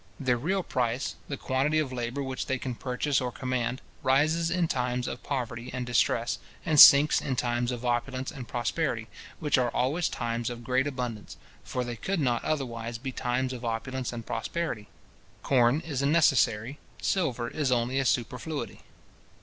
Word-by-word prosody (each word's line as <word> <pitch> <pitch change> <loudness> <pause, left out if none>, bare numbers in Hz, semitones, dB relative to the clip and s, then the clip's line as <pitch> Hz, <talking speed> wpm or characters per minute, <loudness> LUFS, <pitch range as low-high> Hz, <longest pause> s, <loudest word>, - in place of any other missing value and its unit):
Their 130 -4 +2
real 185 +10 -1
price, 125 -3 -1
the 140 - -4
quantity 135 +5 0
of 145 -4 0
labour 125 +3 -3
which 130 -1 -4
they 130 - 0
can 130 0 -4
purchase 130 +3 -1
or 125 -1 -2
command, 125 -1 -2 0.2
rises 155 +5 +2
in 175 -1 +1
times 125 -3 -1
of - - -5
poverty 125 -3 -4
and 125 -1 -3
distress, 120 -1 +1 0.3
and 155 -2 +3
sinks 140 +3 +9
in 130 - -2
times 120 0 0
of 125 0 -5
opulence 130 +2 -1
and 125 -3 -8
prosperity, 120 0 -2 0.3
which 150 -4 +2
are 125 -1 +2
always 140 +9 0
times 120 0 -2
of 120 -1 -7
great 130 +3 +1
abundance; 125 -6 -5 0.3
for 125 - -3
they 120 -1 -5
could 190 - -2
not 125 -5 +1
otherwise 120 -6 -2
be 130 +3 -5
times 130 +1 -1
of 125 -1 -7
opulence 120 +3 -3
and 115 -2 -6
prosperity. 115 -1 -3 0.6
Corn 125 +2 +3
is 145 -6 -3
a 140 - +2
necessary, 135 -5 +3 0.2
silver 130 -11 0
is 140 0 -1
only 125 +2 +1
a 135 - 0
superfluity. 125 +6 -2
125 Hz, 170 wpm, -28 LUFS, 120-140 Hz, 0.6 s, sinks